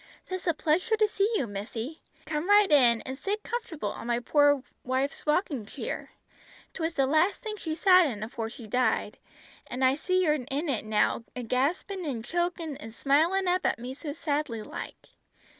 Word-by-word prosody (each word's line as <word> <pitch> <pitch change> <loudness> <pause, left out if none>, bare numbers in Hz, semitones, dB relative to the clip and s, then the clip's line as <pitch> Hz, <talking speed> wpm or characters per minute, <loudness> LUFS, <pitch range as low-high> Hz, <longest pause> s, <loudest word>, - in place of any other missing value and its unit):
"'Tis 370 -1 -4
a 335 - +4
pleasure 330 +9 +2
to 430 0 +4
see 410 +1 +1
you, 395 - +1
missy. 225 +7 -6 0.2
Come 310 +4 -2
right 410 -3 +6
in, 240 -6 +5
an' 265 0 -6
sit 410 +8 -2
comfortable 465 -10 -4
on - - -8
my 240 0 +1
poor 290 +2 +3 0.2
wife's 260 +4 -2
rocking 300 - +1
cheer. 205 - -5 0.6
'Twas 330 -1 -2
the 270 - +3
last 315 +8 +2
thing 435 -2 -4
she 320 -6 -4
sat 365 0 +6
in 215 -6 -4
afore 225 0 -4
she 235 0 -10
died, 250 +4 0 0.5
an' 255 +2 -3
I 260 0 +5
see 370 +6 +1
her 305 -4 +4
in 290 +3 -2
it 235 -6 -1
now 215 +1 +1
a 250 - -4
gaspin' 300 - -1
an' 255 -8 -3
chokin', 340 -1 -2
an' 220 +1 -9
smilin' 325 +10 +2
up 360 +1 +2
at - - +1
me 245 +3 -6
so 290 +2 -6
sadly 290 -7 -2
like. - - -8
295 Hz, 185 wpm, -28 LUFS, 250-355 Hz, 0.6 s, right